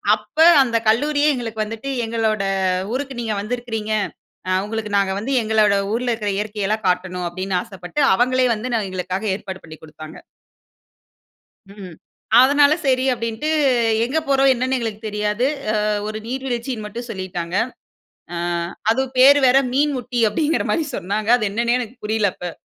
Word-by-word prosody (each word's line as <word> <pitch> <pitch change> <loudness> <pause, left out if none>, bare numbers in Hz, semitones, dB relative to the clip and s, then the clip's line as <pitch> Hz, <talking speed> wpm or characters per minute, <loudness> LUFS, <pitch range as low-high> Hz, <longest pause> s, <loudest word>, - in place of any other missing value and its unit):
அப்ப - - -18 0.3
அந்த 230 -2 0
கல்லூரியே 290 +6 +3
எங்களுக்கு 225 -3 -3
வந்துட்டு, 225 +5 -6 0.2
"எங்களோட 220 -3 -1 0.5
ஊருக்கு 265 -2 -4
நீங்க 220 -2 -2
வந்திருக்கிறீங்க, 225 -1 -4 0.6
அ - - +1
உங்களுக்கு 215 -1 -4
நாங்க 195 -1 +1
வந்து 255 +6 -4
எங்களோட 215 -2 +3 0.2
ஊர்ல 245 +1 0
இருக்கிற 210 -3 -2
இயற்கை 210 0 -3
எல்லாம் 215 -1 -2
காட்டணும்." 180 0 -1
அப்படீன்னு 185 +1 -2
ஆசைப்பட்டு, 190 - -7 0.2
அவங்களே 255 +2 +2
வந்து 225 +4 -4
என்ன 220 -4 0
எங்களுக்காக 185 +3 -3
ஏற்பாடு 190 -2 -8
பண்ணி 160 -1 -11
குடுத்தாங்க. 155 0 -11 1.5
ம். 190 -5 -10 0.5
அதனால 285 +2 +5
சரி 260 -1 +2
அப்படீன்ட்டு, 230 +5 -3 0.6
எங்க 300 +6 0
போறோம்? 270 0 +4
என்னன்னு 255 +2 -1
எங்களுக்கு 225 -2 -4
தெரியாது. 210 +4 -1 0.4
அ - - 0 0.2
ஒரு 215 0 -4
நீர்வீழ்ச்சின்னு 245 -3 -4
மட்டும் 235 +3 -7
சொல்லிட்டாங்க. 180 -3 -5 0.8
அ - - -4 0.5
அதுவும் 260 +2 0
பேரு 280 +3 +8
வேற 255 +2 +6 0.2
"மீன்முட்டி" 260 -4 0
அப்படிங்கிற 315 +7 0
மாரி 320 -3 0
சொன்னாங்க. 205 +4 -3
அது 215 -3 -1
என்னன்னே 235 +3 +1
எனக்குப் 240 -1 -8
புரியல 215 -2 +1
அப்ப. 175 -1 -6
225 Hz, 145 wpm, -20 LUFS, 205-255 Hz, 1.5 s, பேரு